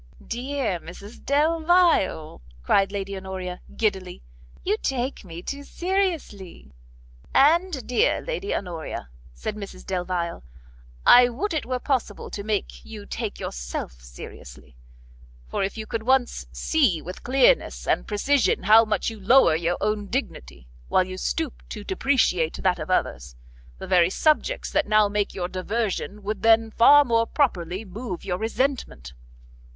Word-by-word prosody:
"Dear 245 -5 -2
Mrs 200 +7 -12
Delvile," 315 - +2 0.2
cried 195 - +3
Lady 200 -1 -4
Honoria, 185 -1 -6
giddily, 190 -5 -2 0.4
"you 410 - +1
take 260 -1 -2
me 170 -2 -9
too 280 0 -5
seriously." 330 - -3 0.6
"And 320 0 +3
dear 245 - +2
Lady 475 -5 -4
Honoria," 170 - -5 0.3
said 215 - -4
Mrs 200 -3 -9
Delvile, 180 -2 -3 0.6
"I 245 0 +8
would 310 - -3
it 305 -6 -2
were 255 0 -1
possible 250 -5 -2
to 200 - -5
make 210 -1 -3
you 210 -2 -10
take 220 -1 -5
yourself - - -6
seriously; - - -12 0.7
for - - -3
could - - -15
you 220 - -5 0.2
once 260 -1 +1
see 265 - +1
with 180 +4 -9
clearness 270 - +2
and - - +1
precision 250 +6 +1
how 215 +3 +7
much 215 0 -1
you 220 - -10
lower 200 -5 +5
your 170 +2 -1
own 210 0 -1
dignity, 65 - -5 0.2
while 185 - +3
you 185 0 -7
stoop 295 - -3
to 210 - -7
depreciate 225 - +1
that 180 -2 +2
of 155 - -6
others, 65 - -1 0.4
the - - -7
very 180 -1 +4
subjects 310 - +1
that 300 - +1
now 215 0 +4
make 205 0 -2
your 175 -2 -2
diversion, 205 +2 -3
would 215 +2 -3
then, 225 0 +4
far 290 +6 +7
more 230 -2 +2
properly, 190 - -1
move 200 -1 -7
your 180 -1 -2
resentment." 225 - -2
210 Hz, 140 wpm, -24 LUFS, 180-265 Hz, 0.7 s, I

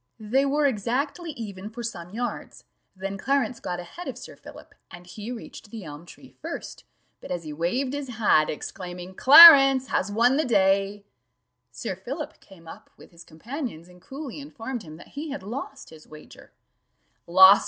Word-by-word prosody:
They 245 +6 +1
were 290 +2 +1
exactly 275 - -2
even 210 -6 -8
for 235 +2 -8
some 175 -7 -6
yards, 240 +5 -6 0.3
then 195 +1 -6
Clarence 270 +3 0
got 175 -1 -5
ahead 260 - -9
of - - -6
Sir - - -11
Philip, - - -14 0.2
and 175 0 -12
he 210 +6 -8
reached 230 -2 -10
the 220 -1 -8
elm 150 +1 -10
tree - - -15
first; - - -8 0.3
but - - -12
as 175 -2 -4
he 155 -1 -7
waved 245 - -2
his 285 -1 -4
hat, 215 -10 +2
exclaiming, 180 +3 -7
"Clarence 275 - +9
has 195 - -1
won 240 +5 +3
the 310 - +2
day," 200 -3 +1 0.7
Sir - - -6
Philip - - -7
came 170 -4 -18
up - - -12
with - - -17
his 170 0 -14
companions, 195 - -7
and 180 0 -18
coolly 275 - -8
informed 265 -4 -7
him 155 -6 -11
that 175 - -15
he 300 +3 -7
had 280 -8 -6
lost 275 +6 -7
his 155 -1 -15
wager 155 0 -15 0.8
"Lost! 190 +3 +8
215 Hz, 175 wpm, -25 LUFS, 180-270 Hz, 0.8 s, Clarence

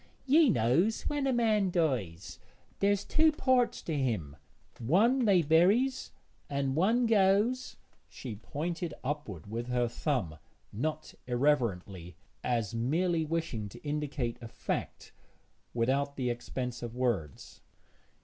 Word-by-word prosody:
'Ye 295 +2 +5
knows 170 - +2
when 290 -2 -1
a - - +2
man 220 -5 +2
dies, 120 - -2 0.4
there's 200 0 +2
two 315 0 +4
parts 260 -5 +1
to 160 - -3
him; 110 - -1 0.4
one 220 - +3
they 190 -5 +4
buries, 195 - +3 0.4
and 140 -1 -1
one 225 +9 +3
goes 215 +4 +2
' - - -36
she 120 -5 -7
pointed 165 - -4
upward 130 - -4
with 115 +3 -5
her 125 -1 +1
thumb, 115 - -2 0.3
not 155 +7 -3
irreverently, 110 - 0 0.3
but - - -4
as 115 -4 0
merely 160 +8 +1
wishing 155 -10 -3
to - - -13
indicate 145 -5 -3
a 115 - -7
fact - - -5 0.6
without 135 +4 0
the 125 -2 -1
expense 125 +1 -5
of 120 -1 -6
words. 115 - -3
145 Hz, 130 wpm, -30 LUFS, 120-195 Hz, 0.6 s, Ye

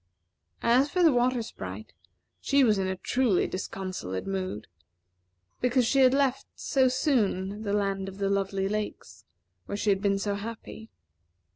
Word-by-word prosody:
As 250 +5 +4
for 360 +3 +1
the 325 - +7
Water 245 0 +2
Sprite, - - -8 0.5
she 280 -1 +3
was 215 -5 +3
in 190 - 0
a 190 - -2
truly 235 0 +1
disconsolate 185 - -5
mood, 185 - -3 0.9
because 250 0 +2
she 275 - +2
had 260 -1 +6
left 270 -1 +1
so 265 -1 +2
soon 215 - 0
the 205 -2 -3
Land 195 -1 -1
of 190 - -11
the 200 -1 -1
Lovely 195 -1 0
Lakes, 210 +1 -5 0.4
where 200 - -3
she 205 0 +1
had 195 0 0
been 200 -1 +2
so 200 +1 -1
happy. 220 +1 -7
210 Hz, 155 wpm, -27 LUFS, 195-250 Hz, 0.9 s, the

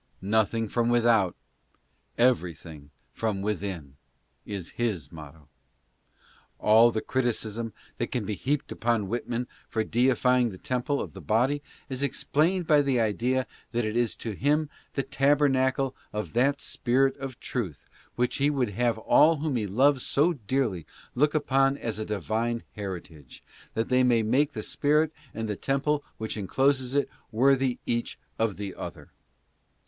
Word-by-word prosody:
"Nothing 110 +2 +1
from 120 +2 0
without, 115 -6 +3 0.8
everything 85 - 0 0.2
from 105 0 -2
within," 95 -9 -4 0.5
is 100 -5 -5
his 105 - -2
motto. 75 -2 -12 1.1
All 110 +2 +6
the 110 -2 -2
criticism 115 -3 -2 0.3
that - - 0
can 120 -5 -1
be 105 - -2
heaped 140 +7 -2
upon 115 -4 0
Whitman 120 +1 -2 0.2
for 110 - 0
deify 125 +2 +3
ing 120 -1 +2
the 95 - -9
temple 130 +6 -1
of - - -5
the - - -9
body 125 +6 +1 0.3
is 130 -1 -4
explained 160 +6 +1
by 150 -2 +5
the 135 -3 +1
idea 120 +4 +1 0.3
that 120 -1 0
it 110 +1 -2
is 120 -2 +1
to 115 - -5
him 145 +7 +1 0.2
the 135 - 0
tabernacle 135 -1 +2 0.2
of 105 0 -4
that 135 +4 +2
spirit 135 +2 +1
of 135 -3 -7
truth 100 - -4 0.3
which 125 0 0
he 145 +1 +3
would 135 -6 0
have 120 +1 +1
all 155 +8 +5
whom 150 -2 -1
he 110 -4 -1
loves 130 +6 +3
so 160 +5 +2
dearly 115 - -1 0.3
look 150 +4 +2
upon 135 -2 +2
as 115 -4 -4
a 110 - -2
divine 115 +3 -2
heritage, 85 -8 -8 0.3
that 115 +1 -1
they 130 0 +4
may 120 -3 +3
make 140 +7 +2
the 110 - -4
spirit 150 +2 +1 0.2
and 110 0 -4
the 105 - -2
temple 145 +5 0
which 110 0 -4
encloses 130 +5 +1
it 140 - +2 0.2
worthy 130 +2 +3
each 120 0 -2 0.2
of 110 -3 0
the 100 -2 -5
other. - - -8
120 Hz, 155 wpm, -27 LUFS, 105-135 Hz, 1.1 s, All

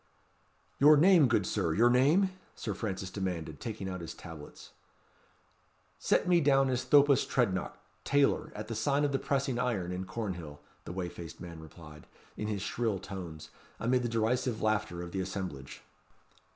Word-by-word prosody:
"Your 150 +2 +8
name, 170 -2 +6
good 110 -4 +1
Sir, 80 -2 -1
your 120 +2 +5
name?" 155 +10 +4 0.2
Sir 105 - -4
Francis 95 -2 -4
demanded, 90 -5 -4
taking 110 -4 -5
out 90 -1 -5
his 85 - -7
tablets. 80 -4 -11 1.3
"Set - - +1
me 175 -1 +4
down 135 -2 +3
as 125 0 -1
Thopas 145 -2 +5
Trednock, 95 -8 -1 0.3
tailor, 140 0 +2
at 105 +1 -6
the 115 - -4
sign 140 +6 +1
of 145 - 0
the 135 - 0
Pressing 135 -3 -1
Iron, 110 -8 -1
in 90 +1 -4
Cornhill," 90 -10 -5 0.3
the - - -6
whey 90 0 -3
faced 85 -2 -9
man 85 -2 -9
replied, 75 -1 -13 0.3
in 105 - -4
his 105 -2 -3
shrill 110 0 -1
tones, 90 -5 -8 0.3
amid 125 +2 +2
the 120 - -2
derisive 115 +1 0
laughter 105 -5 -1
of 85 - -8
the 95 - -2
assemblage. 90 -8 -6
110 Hz, 165 wpm, -31 LUFS, 90-130 Hz, 1.3 s, Your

